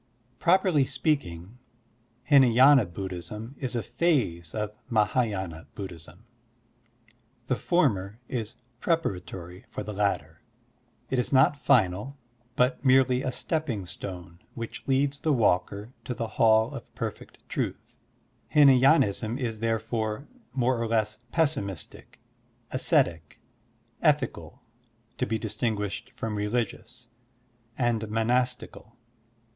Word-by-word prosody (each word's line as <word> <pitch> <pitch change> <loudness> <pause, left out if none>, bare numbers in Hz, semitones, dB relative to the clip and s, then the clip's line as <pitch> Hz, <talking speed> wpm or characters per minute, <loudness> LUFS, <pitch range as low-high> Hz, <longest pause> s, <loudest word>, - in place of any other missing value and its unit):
Properly 180 -4 +4
speaking, 115 - -2 0.7
Htnay^na 130 -4 +6
Buddhism 95 +6 -6
is 130 -2 -3
a 115 - -1
phase 115 - 0
of 105 -1 -2 0.2
Mah^yina 105 - 0
Buddhism. 90 0 -9 1.2
The 130 - 0
former 105 - +1
is 115 -2 -4 0.2
preparatory 95 - -3
for - - -5
the 105 +1 -6
latter. 80 -6 -1 0.7
It 130 - +1
is 125 - -1
not 135 +2 +5
final, 110 +4 +2 0.4
but 125 +1 +1
merely 130 -1 +4
a 130 - -2
stepping 130 - -2
stone 90 -2 -8 0.2
which 115 -1 -6
leads 140 +1 +1
the 155 - 0
walker 105 0 +1
to 125 - -3
the 115 - -2
hall 110 0 +3
of - - -10
perfect - - -7
truth. - - -4 0.6
Hinaydnism 130 -5 +5
is 115 -4 -3
therefore 115 +2 -2 0.2
more 125 -1 +1
or 115 - 0
less 110 -1 0
pessimistic, 140 - -2 0.5
ascetic, 130 - +1 0.6
ethical - - 0 0.6
(to - - 0
be 110 +1 0
distinguished 110 0 -2
from 115 -3 -5
religious), 115 +3 -3 0.7
and 120 -3 +1
monas 120 +3 +1
tical. 115 -1 -13
115 Hz, 110 wpm, -27 LUFS, 100-130 Hz, 1.2 s, Htnay^na